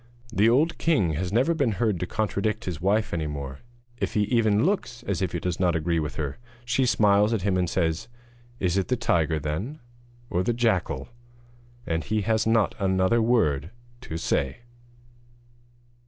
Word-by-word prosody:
The 105 +2 +4
old 155 +8 +2
king 115 - +2
has 90 +4 -2
never 130 +10 +3
been 140 -9 +1
heard 105 -4 0
to 90 - -2
contradict 110 +2 -1
his 85 -4 -4
wife 105 +4 +1
any 80 -3 -1
more. 70 -2 -6 0.4
If - - -3
he 105 - +3
even 110 -1 +2
looks 145 - -1
as 100 -5 -2
if 95 - 0
he - - -1
does 90 -1 -3
not 90 -3 +2
agree 80 +1 0
with 75 -1 -3
her, 75 - -4 0.3
she 125 +2 +1
smiles 105 -1 +4
at 105 -5 -1
him 100 -2 +1
and 90 -2 +1
says: 80 -3 -1 0.5
'Is 90 0 +1
it 95 - 0
the 125 - 0
tiger, 80 -8 +1
then? 80 - -3 0.5
or 90 - 0
the 105 +6 0
jackal?' 95 - 0 0.8
And 80 -1 -1
he 110 +1 -1
has 110 +2 +1
not 110 -2 +3
another 95 +3 +2
word 85 - +2 0.4
to 80 - -3
say. 70 - -1
100 Hz, 175 wpm, -26 LUFS, 85-115 Hz, 0.8 s, The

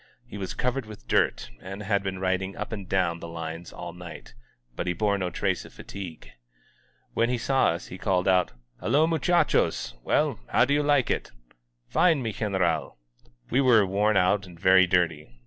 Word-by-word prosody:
He 105 -4 -9
was 95 - -4
covered 125 -1 -1
with 105 - -12
dirt, - - +1
and 95 +2 -7
had 100 0 +1
been 95 -1 -4
riding 95 +1 -1
up - - -5
and 100 -4 -6
down 90 -3 +1
the 85 - -7
lines 85 0 -6
all 85 -1 -7
night; 90 -1 -10 0.4
but 90 - -3
he 90 - +1
bore 100 +3 +1
no 90 -1 -1
trace - - -1
of - - -14
fatigue. 90 -5 -9 0.8
When 115 - +2
he 125 - 0
saw 135 +3 +2
us 85 +1 -2
he 90 - -8
called 90 -2 +1
out, 90 -2 +3 0.3
"Hello, 145 +7 +3
muchachosi 165 - +1
Well, - - +1
how - - +4
do 140 - +1
you 145 - +3
like 145 -3 +2
it.'^" - - -2 0.6
"Fine, 165 -7 +3
mi 110 -2 -2
Generair 95 -7 0 0.6
We 130 - +3
were 120 -6 +5
worn 100 +2 +2
out 95 +2 +2
and 85 -2 -14
very 95 0 +6
dirty. 85 -5 +1
95 Hz, 185 wpm, -26 LUFS, 90-115 Hz, 0.8 s, very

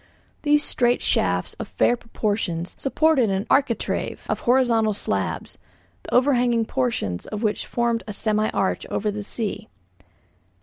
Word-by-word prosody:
These 295 0 +3
straight 245 -3 +2
shafts, - - +1
of - - -4
fair 240 - +2
proportions, 205 -7 -2
supported 275 -4 +2
an 195 +2 -1
architrave 265 -5 0
of - - -1
horizontal 235 -4 +3
slabs, 100 - -3 0.4
the - - -10
overhanging 245 -3 +3
portion 115 - -1
of 210 +1 -4
which 210 -1 -1
formed 235 -1 0
a 210 - -4
semi 215 +1 0
arch 190 - -1
over 210 0 -1
the 210 +1 -5
sea. 215 0 -4
225 Hz, 135 wpm, -23 LUFS, 205-245 Hz, 0.4 s, These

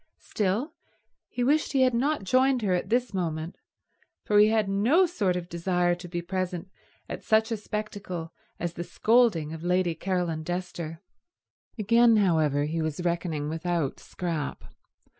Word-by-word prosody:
Still, 210 - -1 0.6
he 245 - -2
wished 295 +5 +2
he 265 -1 +4
had 255 -1 +3
not 280 +2 0
joined 255 +3 +3
her 190 -3 +2
at 180 - -1
this 240 0 +1
moment, 165 -2 -3 0.7
for 205 0 +4
he 210 - +7
had 220 -2 +2
no 230 - +4
sort 205 - 0
of 175 -1 -4
desire 175 +1 +1
to 175 +1 -7
be 175 0 -4
present 185 0 -3 0.4
at - - -6
such 220 0 +2
a - - +1
spectacle 205 -6 -5 0.3
as 170 0 -3
the 170 - -5
scolding 210 -8 +2
of 160 - -7
Lady 180 -1 +1
Caroline 175 -2 -2
Dester. 170 -2 -5 0.8
Again, 230 +2 +5
however, 160 -7 +2
he 160 +2 -2
was 155 +2 -3
reckoning 170 -4 -1
without 165 -2 -2
Scrap. 165 -5 -4
180 Hz, 155 wpm, -27 LUFS, 170-220 Hz, 0.8 s, he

